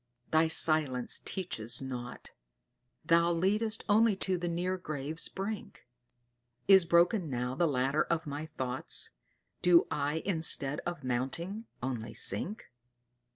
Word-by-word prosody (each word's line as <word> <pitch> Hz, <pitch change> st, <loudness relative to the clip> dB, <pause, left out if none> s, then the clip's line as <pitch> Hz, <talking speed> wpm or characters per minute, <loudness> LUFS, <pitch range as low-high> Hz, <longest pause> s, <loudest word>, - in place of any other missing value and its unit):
thy 160 Hz, +1 st, +4 dB
silence 155 Hz, -6 st, +2 dB
teaches 120 Hz, -, -3 dB
nought, 125 Hz, -2 st, -7 dB, 0.7 s
Thou 170 Hz, 0 st, +3 dB
leadest 210 Hz, +6 st, 0 dB
only 215 Hz, 0 st, +4 dB
to 190 Hz, -1 st, -1 dB
the 175 Hz, 0 st, -3 dB
near 175 Hz, +2 st, -1 dB
grave's 155 Hz, -3 st, -3 dB
brink; 200 Hz, +2 st, -6 dB, 0.8 s
Is 190 Hz, -3 st, +7 dB
broken 170 Hz, +1 st, +3 dB
now 125 Hz, -1 st, -2 dB
the 170 Hz, +5 st, +1 dB
ladder 135 Hz, +1 st, +1 dB
of 165 Hz, -1 st, -1 dB
my 145 Hz, +2 st, -5 dB
thoughts? 130 Hz, -4 st, +1 dB, 0.5 s
Do 175 Hz, -1 st, +5 dB
I 150 Hz, +2 st, -2 dB
instead 160 Hz, -6 st, +2 dB
of 175 Hz, -5 st, -5 dB
mounting 150 Hz, -, -3 dB, 0.2 s
only 120 Hz, -3 st, -4 dB
sink? 210 Hz, -, -3 dB
160 Hz, 120 wpm, -31 LUFS, 135-185 Hz, 0.8 s, Is